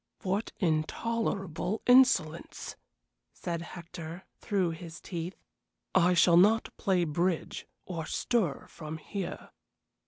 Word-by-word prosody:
"What 195 Hz, +3 st, -1 dB
intolerable 195 Hz, +2 st, -1 dB
insolence!" 250 Hz, -11 st, +3 dB, 0.6 s
said 170 Hz, -1 st, -4 dB
Hector, 170 Hz, 0 st, -8 dB
through 190 Hz, -5 st, 0 dB
his 165 Hz, 0 st, -8 dB
teeth. 175 Hz, 0 st, -5 dB, 0.6 s
"I 180 Hz, +1 st, +5 dB
shall 170 Hz, +1 st, +6 dB
not 215 Hz, +5 st, +4 dB
play 190 Hz, -4 st, +2 dB
bridge 170 Hz, +2 st, -1 dB, 0.2 s
or 165 Hz, -4 st, -4 dB
stir 210 Hz, -, 0 dB
from 155 Hz, 0 st, -7 dB
here." 180 Hz, +3 st, -6 dB
175 Hz, 100 wpm, -30 LUFS, 165-200 Hz, 0.6 s, shall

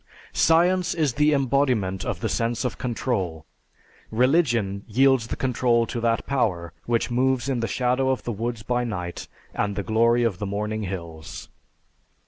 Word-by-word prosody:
Science 175 Hz, +2 st, +3 dB
is 155 Hz, -6 st, +1 dB
the 150 Hz, +3 st, +3 dB
embodiment 130 Hz, -9 st, +1 dB
of -, -, -3 dB
the -, -, 0 dB
sense 115 Hz, +2 st, -1 dB
of 125 Hz, -, -3 dB
control, 100 Hz, -, -2 dB, 0.6 s
religion 120 Hz, -, +2 dB
yields 130 Hz, +1 st, +3 dB
the -, -, -3 dB
control 120 Hz, -2 st, +1 dB
to 120 Hz, 0 st, -4 dB
that 115 Hz, -1 st, +1 dB
power 90 Hz, -, -1 dB
which 120 Hz, +1 st, 0 dB
moves 130 Hz, +1 st, +1 dB
in 130 Hz, -3 st, 0 dB
the 115 Hz, -, -1 dB
shadow 125 Hz, +2 st, +1 dB
of 130 Hz, -, -1 dB
the 120 Hz, -, -3 dB
woods 115 Hz, +1 st, -4 dB
by 125 Hz, +1 st, 0 dB
night, 90 Hz, -7 st, -5 dB, 0.3 s
and 100 Hz, -1 st, -1 dB
the 100 Hz, -, -2 dB
glory 115 Hz, +2 st, +3 dB
of 110 Hz, -6 st, 0 dB
the 105 Hz, -, -3 dB
morning 105 Hz, +2 st, -2 dB
hills.... 85 Hz, -5 st, -7 dB
120 Hz, 160 wpm, -24 LUFS, 105-130 Hz, 0.6 s, Science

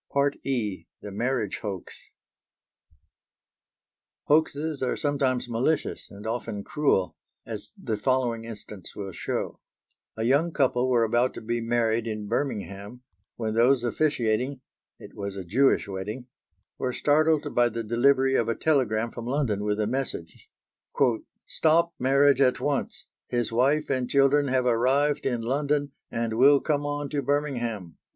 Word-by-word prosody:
E. 115 Hz, -8 st, -2 dB, 0.2 s
THE 105 Hz, -, -6 dB
MARRIAGE 115 Hz, 0 st, -1 dB
HOAX 100 Hz, -5 st, -7 dB, 2.1 s
Hoaxes 155 Hz, 0 st, +1 dB
are 130 Hz, -, 0 dB
sometimes 135 Hz, -4 st, 0 dB
malicious, 125 Hz, +7 st, -1 dB
and 100 Hz, +2 st, -11 dB
often 110 Hz, -3 st, -3 dB
cruel, 140 Hz, -11 st, +1 dB, 0.3 s
as -, -, -5 dB
the 110 Hz, -, -2 dB
following 120 Hz, 0 st, 0 dB
instance 105 Hz, -4 st, -9 dB
will 100 Hz, -2 st, -5 dB
show: -, -, -4 dB, 0.6 s
A 110 Hz, -, -2 dB
young 145 Hz, +8 st, +2 dB
couple 130 Hz, -2 st, +2 dB
were 120 Hz, -2 st, +3 dB
about 120 Hz, +3 st, +1 dB
to -, -, -7 dB
be 120 Hz, +1 st, -2 dB
married 115 Hz, -1 st, +1 dB
in 105 Hz, -2 st, -4 dB
Birmingham 110 Hz, -2 st, -4 dB, 0.3 s
when 110 Hz, -2 st, -2 dB
those 120 Hz, +2 st, +4 dB
officiating 125 Hz, 0 st, 0 dB, 0.4 s
it -, -, -13 dB
was 100 Hz, -1 st, -5 dB
a 95 Hz, -2 st, -6 dB
Jewish 125 Hz, +4 st, +3 dB
wedding 100 Hz, +6 st, -5 dB, 0.5 s
were 125 Hz, -1 st, -1 dB
startled 155 Hz, +2 st, +2 dB
by 120 Hz, 0 st, +4 dB
the 115 Hz, 0 st, -4 dB
delivery 130 Hz, +4 st, +3 dB
of 115 Hz, -3 st, +2 dB
a 115 Hz, -, 0 dB
telegram 120 Hz, -7 st, +1 dB
from 120 Hz, -1 st, -7 dB
London 125 Hz, -7 st, 0 dB
with 105 Hz, 0 st, 0 dB
the 110 Hz, -, 0 dB
message: 120 Hz, -8 st, -4 dB, 1.0 s
"Stop 170 Hz, +2 st, +2 dB
marriage 140 Hz, +1 st, +4 dB
at 130 Hz, -2 st, +3 dB
once. 145 Hz, -2 st, -2 dB, 0.2 s
His 120 Hz, -2 st, -1 dB
wife 140 Hz, +6 st, +2 dB
and 130 Hz, -2 st, -1 dB
children 140 Hz, +1 st, +4 dB
have 130 Hz, -1 st, +1 dB
arrived 135 Hz, +5 st, +2 dB
in 120 Hz, -3 st, -1 dB
London 145 Hz, +3 st, 0 dB, 0.2 s
and 115 Hz, -1 st, -2 dB
will 140 Hz, +2 st, +7 dB
come 145 Hz, -1 st, -1 dB
on 145 Hz, 0 st, -2 dB
to 145 Hz, 0 st, -1 dB
Birmingham." 120 Hz, -, -2 dB
125 Hz, 140 wpm, -26 LUFS, 110-140 Hz, 2.1 s, will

